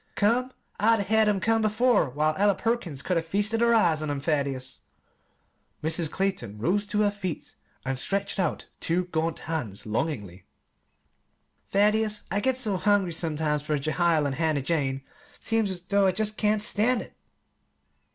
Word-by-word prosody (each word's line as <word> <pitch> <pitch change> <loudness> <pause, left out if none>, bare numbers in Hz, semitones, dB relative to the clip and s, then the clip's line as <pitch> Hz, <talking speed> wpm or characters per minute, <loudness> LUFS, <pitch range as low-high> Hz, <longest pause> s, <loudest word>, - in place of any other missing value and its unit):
"Come! 240 +5 +2 0.3
I'd 225 +1 +4
'a' - - 0
had 220 +1 +3
'em 200 -2 +1
come 225 +4 +2
before, 220 - +2
while 150 +4 +1
Ella 200 +1 +3
Perkins 195 - -2
could 180 - 0
'a' - - +2
feasted 205 +7 0
her 235 0 +4
eyes 170 -8 +3
on 155 - -3
'em. 145 -1 -2
Thaddeus," 140 -3 -2 1.0
Mrs. 160 0 +2
Clayton 185 - -2
rose 195 - 0
to 210 +1 0
her 205 -1 +3
feet 190 -5 -6 0.3
and 135 0 -2
stretched 200 +6 -1
out 175 -5 -1
two 175 +2 0
gaunt 165 -2 -2
hands 135 -12 -4
longingly, 105 - -3 1.3
"Thaddeus, 210 +1 +2
I 200 - +2
get 260 +3 +1
so 215 -7 0
hungry 200 -2 +2
sometimes 155 -2 -1
for 150 0 -1
Jehiel 155 +2 +1
and 140 - -1
Hannah 155 -4 0
Jane, 135 -3 -1 0.4
seems 225 -2 0
as 185 -2 -5
though 200 +1 +2
I 185 - +2
jest 215 +2 -2
couldn't 215 0 +1
stand 225 +4 +2
it!" - - -17
185 Hz, 165 wpm, -26 LUFS, 155-210 Hz, 1.3 s, I'd